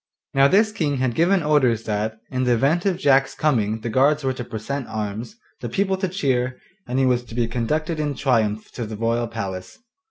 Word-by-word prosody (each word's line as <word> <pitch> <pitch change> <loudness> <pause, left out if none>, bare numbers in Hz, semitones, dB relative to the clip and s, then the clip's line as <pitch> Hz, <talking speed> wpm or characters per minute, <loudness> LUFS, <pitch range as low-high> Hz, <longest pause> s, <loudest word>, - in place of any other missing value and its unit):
Now 135 0 +6
this 215 +7 +4
King 150 -9 -1
had 130 -2 0
given 175 +5 +3
orders 130 -7 +2
that, 110 +1 -2
in 130 0 -1
the 125 -1 +3
event 155 - +2
of 185 -3 +1
Jack's 135 -5 +3
coming 110 -7 +1
the 115 - -3
guards 145 +5 +3
were 130 0 0
to 125 - -5
present 120 +4 -5
arms, 110 - -5 0.2
the - - -5
people 195 -1 +1
to 190 0 -1
cheer, 130 -8 -1 0.3
and 125 - -2
he 135 - +3
was 125 -1 +2
to 115 - -10
be 120 -1 +1
conducted 155 +8 -1
in 145 -2 -1
triumph 110 -5 0
to 120 -3 -5
the 110 -1 -6
royal 115 +1 0
palace. 95 -5 -6
130 Hz, 210 wpm, -22 LUFS, 115-150 Hz, 0.3 s, Now